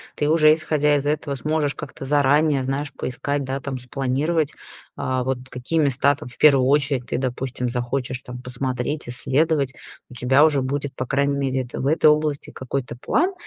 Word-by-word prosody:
ты 145 - 0
уже, 155 -1 +6
исходя 150 -2 +1
из 145 0 -1
этого, 145 -1 -1
сможешь 150 0 -1
как-то 135 - -8
заранее, 145 0 +3
знаешь, 140 +3 -2
поискать, 140 +3 -3
да, 135 +1 -3
там, 135 -1 -5
спланировать, 135 +5 -1 0.4
а, 130 0 -1
вот 130 0 -1
какие 130 +6 -2
места 140 0 +3
там, 135 - -10
в 125 - -14
первую 140 -4 +6
очередь, 140 -3 +2
ты, - - -2
допустим, 125 -1 -3
захочешь 125 +1 -3
там 125 0 -9
посмотреть, 125 +3 -3
исследовать. 140 +2 0 0.4
У - - -12
тебя 130 +4 +4
уже 145 -4 +3
будет, 140 +1 -3
по 130 - -3
крайней 140 +2 +1
мере, 130 -1 0
это 125 - -7
в 135 - -1
этой 155 +1 +4
области 150 -1 +1
какой-то 130 -2 -4
план. 360 +5 +1
140 Hz, 180 wpm, -22 LUFS, 130-150 Hz, 0.4 s, уже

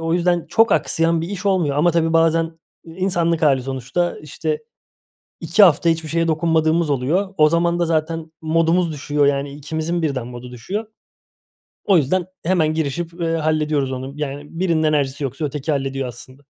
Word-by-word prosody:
o 165 0 0
yüzden 175 -1 +1
çok 225 0 +4
aksayan 165 0 +1
bir 165 - -4
iş 200 0 -5
olmuyor 175 -8 +1
ama 175 +4 +4
tabii 165 -1 +1
bazen 165 0 +2 0.3
insanlık 170 -1 -1
hâli 135 -4 +3
sonuçta. 135 +7 -2
İşte, 155 +1 -3 0.8
2 170 +6 +4
hafta 170 -2 +5
hiçbir 160 -1 -1
şeye 165 +1 0
dokunmadığımız 160 0 +1
oluyor. 160 +9 0
O 155 0 +5
zaman 170 +1 +1
da 175 - +2
zaten 160 0 -2
modumuz 165 +2 +2
düşüyor, 145 0 0
yani, 140 0 0
ikimizin 160 +4 -3
birden 135 -6 -2
modu 125 0 -9
düşüyor. 190 - -5 1.0
O 195 -3 +5
yüzden 170 +4 +1 0.2
hemen 165 -3 +2
girişip, 160 +2 -2
eee, 165 -1 0
hallediyoruz 150 -3 0
onu, 130 +1 -5
yani, 145 -1 -4 0.2
birinin 170 -4 +1
enerjisi 145 -2 0
yoksa 135 +3 -3
öteki 145 +1 -3
hallediyor 135 -2 -2
aslında. 130 +3 -11
160 Hz, 165 wpm, -20 LUFS, 145-170 Hz, 1.0 s, hafta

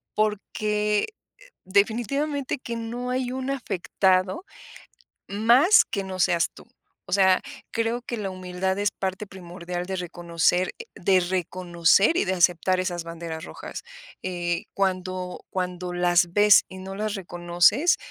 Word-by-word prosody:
porque, 210 0 0 0.3
eh, - - -19 0.2
definitivamente 255 +9 0
que 235 -2 -6
no 235 +2 -4
hay 255 -1 -1
un 260 +1 -3
afectado 195 - 0 0.8
más, 240 - +5
que 195 -2 -3
no 190 -1 -6
seas 170 -2 +2
tú. - - -15 0.4
O - - -11
sea, 190 -1 +4 0.3
creo 230 +1 -1
que 240 - -5
la 200 -3 -3
humildad 185 +1 -3
es 205 0 +1
parte 190 +2 -4
primordial 180 -1 -6
de 190 0 -3
reconocer, 175 0 0
eh, 470 - -7
de 185 +1 +3
reconocer 180 - +2
y - - +2
de 190 0 0
aceptar 180 +1 +3
esas 180 -2 -2
banderas 165 -1 -7
rojas, - - -8 0.4
eh, 175 -2 -2
cuando 185 -1 -2
cuando 180 -1 -3
las 175 -1 +2
ves 205 +1 +6
y 190 - -10
no 190 +1 -7
las 210 +1 -2
reconoces, 175 - +2
190 Hz, 140 wpm, -25 LUFS, 180-215 Hz, 0.8 s, ves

